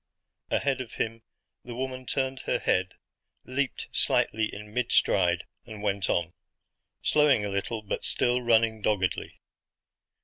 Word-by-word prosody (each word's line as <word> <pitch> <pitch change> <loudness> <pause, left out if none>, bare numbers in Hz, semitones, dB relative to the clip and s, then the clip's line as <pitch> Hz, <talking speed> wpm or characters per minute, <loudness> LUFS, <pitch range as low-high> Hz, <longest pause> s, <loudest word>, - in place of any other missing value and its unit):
Ahead 135 -2 +1
of 120 - -8
him 115 0 -2 0.4
the 120 -1 -7
woman 130 0 -4
turned 130 -1 -1
her - - +2
head, 90 0 0 0.5
leaped 135 +1 -2 0.2
lightly 110 0 +2
in 105 0 -9
mid 125 0 0
stride, 90 -1 +3 0.2
and 110 -3 -9
went 100 -2 0
on; 85 0 0 0.7
slowing 145 -8 +4
a - - -2
little 100 +3 -2
but 105 - -3
still 125 +1 +1
running 115 -2 +3
doggedly. 100 -3 -1
110 Hz, 135 wpm, -28 LUFS, 100-130 Hz, 0.7 s, slowing